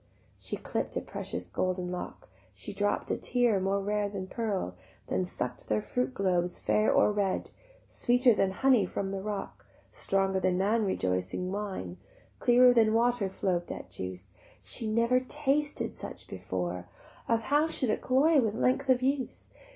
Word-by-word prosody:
She - - -4
clipp'd - - -3
a - - -1
precious 90 - -4
golden 180 - -2
lock, 180 - -6 0.3
She 95 - -5
dropp'd 205 +1 -1
a - - 0
tear 240 -5 +2
more 195 +1 +1
rare 205 +1 -1
than 195 -2 -5
pearl, 200 - -2 0.3
Then 95 0 -1
suck'd - - -5
their 105 - +2
fruit 125 +4 -2
globes 180 -2 +1
fair 215 - +2
or - - +4
red: 200 -2 -1 0.4
Sweeter 245 0 +3
than 195 -2 +2
honey 250 +2 +3
from 195 +1 -3
the 195 -1 -3
rock, 205 0 -5 0.2
Stronger 195 -1 +1
than 185 -1 +1
man 210 +4 +2
rejoicing 95 - -1
wine, 190 - -4 0.4
Clearer 245 +1 +6
than 225 -2 +4
water 235 -3 +2
flow'd 180 -2 -1
that - - -7
juice; 95 +1 -6 0.3
She 230 - -2
never 230 +3 +3
tasted 290 +2 0
such - - -7
before, 90 -1 -4 0.4
How 275 +7 +2
should 260 -7 0
it - - -1
cloy 280 +3 +4
with 220 -3 -1
length 255 +3 +1
of 255 -1 +4
use? 270 -1 -1
200 Hz, 160 wpm, -29 LUFS, 180-245 Hz, 0.4 s, Clearer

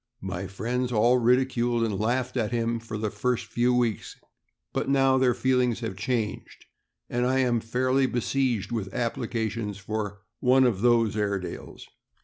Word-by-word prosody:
My 95 0 -4
friends 120 +7 -2
all 120 +2 +4
ridiculed 120 -1 +2
and 105 -4 -1
laughed 120 +4 -1
at 115 -4 0
him 115 -1 0
for 115 -1 -6
the 105 -1 -2
first 120 +3 -1
few 120 +1 +1
weeks, 120 -6 0 0.6
but - - -1
now 135 -1 +4
their 125 -2 +3
feelings 125 -3 +1
have 115 -4 -4
changed, 110 +1 -3 0.4
and 120 0 -1
I 130 +1 +2
am 120 -2 +2
fairly 130 +4 +1
besieged 125 -2 -1
with 105 -5 -3
applications 115 -3 -2
for 105 -1 -4 0.2
"one 130 +1 +4
of 115 -6 +1
those 115 -3 +3
Airedales." 100 -3 -4
120 Hz, 150 wpm, -26 LUFS, 110-125 Hz, 0.6 s, all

